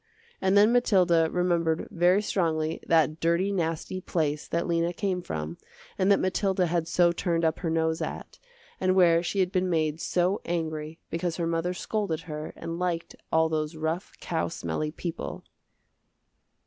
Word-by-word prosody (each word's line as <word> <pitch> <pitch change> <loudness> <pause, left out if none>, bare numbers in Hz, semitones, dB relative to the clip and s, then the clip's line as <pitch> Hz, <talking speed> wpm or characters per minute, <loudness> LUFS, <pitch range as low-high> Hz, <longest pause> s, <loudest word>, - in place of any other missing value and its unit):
And 190 +1 +3
then 210 +3 +6
Mathilda 180 -9 +4
remembered 170 -3 +1
very 180 +2 +3
strongly 160 -5 0
that 160 -1 +3
dirty 170 +4 +1
nasty 170 0 -2
place 150 -4 -1
that 170 0 -1
Lena 170 0 0
came 185 -1 -1
from 80 - -5 0.4
and 190 +1 +2
that 200 - +6
Mathilda 190 0 +1
had 170 -1 0
so 175 0 +4
turned 170 -1 0
up 160 0 +1
her 170 - -2
nose 160 0 0
at, - - -6 0.4
and 185 0 +2
where 170 -3 +5
she 190 +3 0
had 180 -1 0
been 185 -1 +1
made 160 -2 0
so 180 +3 +1
angry 160 -2 -3
because 170 0 -1
her 170 - -1
mother 165 +2 -1
scolded 190 -5 -2
her 155 -2 -6
and 165 +1 -5
liked 175 -2 -2 0.2
all 160 0 +4
those 155 0 -2
rough 160 +4 -3
cow 165 -3 -1
smelly 155 -2 -3
people. 165 +1 -5
170 Hz, 160 wpm, -27 LUFS, 160-180 Hz, 0.4 s, then